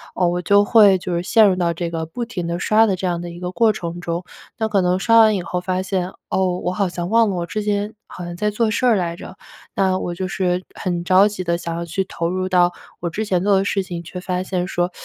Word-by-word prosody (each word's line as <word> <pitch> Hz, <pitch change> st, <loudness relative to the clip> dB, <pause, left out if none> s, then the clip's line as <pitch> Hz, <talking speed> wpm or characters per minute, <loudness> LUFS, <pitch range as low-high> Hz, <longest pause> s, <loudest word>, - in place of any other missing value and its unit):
呃， 185 Hz, -, +1 dB
我 175 Hz, 0 st, -1 dB
就 200 Hz, +4 st, +4 dB
会 205 Hz, -3 st, +6 dB
就 180 Hz, -1 st, -5 dB
是 170 Hz, -, 0 dB
陷 220 Hz, +2 st, +5 dB
入 185 Hz, -, 0 dB
到 170 Hz, -2 st, +1 dB
这 170 Hz, 0 st, -3 dB
个 165 Hz, -1 st, -3 dB
不 235 Hz, +10 st, -5 dB
停 185 Hz, -7 st, -5 dB
地 170 Hz, 0 st, -2 dB
刷 215 Hz, +4 st, +4 dB
的 195 Hz, -3 st, +1 dB
这 185 Hz, -, -5 dB
样 175 Hz, -1 st, -1 dB
的 175 Hz, -, -6 dB
一 170 Hz, -, -9 dB
个 180 Hz, 0 st, -3 dB
过 225 Hz, +1 st, +3 dB
程 170 Hz, -1 st, -5 dB
中。 170 Hz, 0 st, -3 dB, 0.3 s
那 220 Hz, -1 st, -1 dB
可 205 Hz, -2 st, +2 dB
能 180 Hz, 0 st, +2 dB
刷 230 Hz, +4 st, +4 dB
完 215 Hz, -2 st, +6 dB
以 180 Hz, -, -2 dB
后 180 Hz, -, -3 dB
发 185 Hz, +1 st, -2 dB
现， 190 Hz, -1 st, -2 dB, 0.2 s
哦， 185 Hz, -1 st, 0 dB
我 180 Hz, -, 0 dB
好 195 Hz, 0 st, 0 dB
像 175 Hz, 0 st, -4 dB
忘 230 Hz, -1 st, +4 dB
了 190 Hz, -, -2 dB
我 170 Hz, -1 st, -2 dB
之 215 Hz, +4 st, -3 dB
前 205 Hz, +1 st, -1 dB
好 180 Hz, -, -9 dB
像 175 Hz, 0 st, -7 dB
在 210 Hz, +2 st, 0 dB
做 215 Hz, +1 st, 0 dB
事 250 Hz, -, 0 dB
儿 235 Hz, -3 st, +5 dB
来 170 Hz, -2 st, -2 dB
着。 190 Hz, -, -10 dB, 0.4 s
那 190 Hz, -1 st, +1 dB
我 175 Hz, -1 st, -4 dB
就 185 Hz, +1 st, -3 dB
是 180 Hz, -1 st, -1 dB
很 175 Hz, -2 st, -3 dB
着 190 Hz, +3 st, +5 dB
急 205 Hz, -3 st, -4 dB
地 170 Hz, 0 st, 0 dB
想 170 Hz, -1 st, -5 dB
要 170 Hz, -, -3 dB
去 180 Hz, +3 st, -2 dB
投 170 Hz, -2 st, -3 dB
入 185 Hz, +1 st, -2 dB
到 180 Hz, -1 st, +3 dB, 0.3 s
我 170 Hz, -, -2 dB
之 215 Hz, +6 st, -3 dB
前 185 Hz, -3 st, 0 dB
做 200 Hz, -1 st, +4 dB
的 195 Hz, -, +1 dB
事 195 Hz, -2 st, 0 dB
情， 175 Hz, -2 st, -6 dB
却 180 Hz, +2 st, -8 dB
发 180 Hz, -1 st, -2 dB
现 180 Hz, -1 st, -2 dB
说， 175 Hz, -1 st, -1 dB
185 Hz, 300 characters per minute, -20 LUFS, 175-200 Hz, 0.4 s, 会